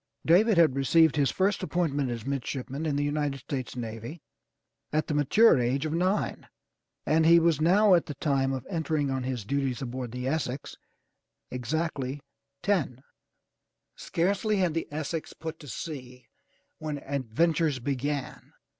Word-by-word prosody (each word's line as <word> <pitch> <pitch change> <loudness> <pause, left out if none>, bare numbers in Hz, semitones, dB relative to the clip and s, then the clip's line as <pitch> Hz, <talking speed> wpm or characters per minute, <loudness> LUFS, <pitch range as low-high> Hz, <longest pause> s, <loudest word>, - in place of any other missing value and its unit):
David 195 +5 +5
had 160 -6 +5
received 160 +3 +4
his 140 -2 +2
first 195 +3 +1
appointment 155 -7 0
as 120 -1 -5
midshipman 140 +2 -3
in 145 - 0
the 145 - +1
United 145 -1 -1
States 130 -3 -5
navy 115 +6 -6 0.7
at 155 +1 +1
the - - -3
mature 150 - +5
age 125 +4 0
of 155 - -2
nine, 185 +5 0 0.6
and 160 +1 +3
he 165 +1 +7
was 165 -2 +2
now 195 +5 +5
at 170 -2 +3
the 145 - -5
time 135 -2 +1
of 130 -2 -4
entering 155 -5 -1
on 130 0 -1
his 125 -4 -3
duties 135 0 -1
aboard 125 -2 -5
the 125 +1 -4
Essex 140 -2 -3 0.8
exactly 135 +1 -2 0.4
ten. 150 - 0 0.9
Scarcely 200 +5 0
had 180 -4 +1
the 165 - -2
Essex 155 +2 -4
put 160 0 -7
to 145 - -12
sea 125 -3 -7 0.5
when 155 -2 -3
adventures 145 +3 0
began. 140 +1 -3
145 Hz, 145 wpm, -28 LUFS, 130-165 Hz, 0.9 s, he